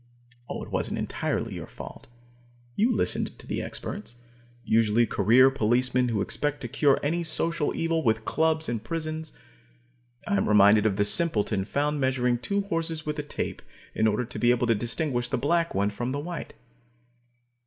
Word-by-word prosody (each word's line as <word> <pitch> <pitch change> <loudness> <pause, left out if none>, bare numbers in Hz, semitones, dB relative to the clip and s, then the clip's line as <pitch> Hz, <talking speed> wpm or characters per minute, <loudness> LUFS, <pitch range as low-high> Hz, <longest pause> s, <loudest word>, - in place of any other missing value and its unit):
It - - -6
wasn't - - -1
entirely - - -2
your - - -7
fault. - - -10 0.7
You 230 +4 +3
listened 225 - -1
to - - -12
the - - -3
experts, 110 +3 -6 0.5
usually 115 +1 +3
career 115 +6 +5
policemen 125 +1 +2
who 110 -4 0
expect 145 +6 -2
to 125 - -4
cure 140 +4 +2
any 170 +4 0
social 165 -1 0
evil 165 0 0
with 110 -2 +1
clubs 160 0 +1
and 115 -2 -3
prisons. 155 +2 -4 0.9
I 100 - +1
am 95 - 0
reminded 105 +1 +6
of 100 - 0
the 100 0 +1
simpleton 105 - +2
found 145 +5 -1
measuring 125 -2 +1
two 200 +10 -1
horses 165 -4 -2
with 150 0 -3
a - - +1
tape 145 - -5 0.3
in 110 - +2
order 110 +3 0
to 115 - -6
be 120 - +3
able 125 0 +3
to 115 - +3
distinguish 120 +2 -1
the 135 - 0
black 165 +6 0
one 100 +1 +1
from 120 +5 -3
the 140 - -2
white. 170 +2 -6
130 Hz, 170 wpm, -26 LUFS, 110-155 Hz, 0.9 s, reminded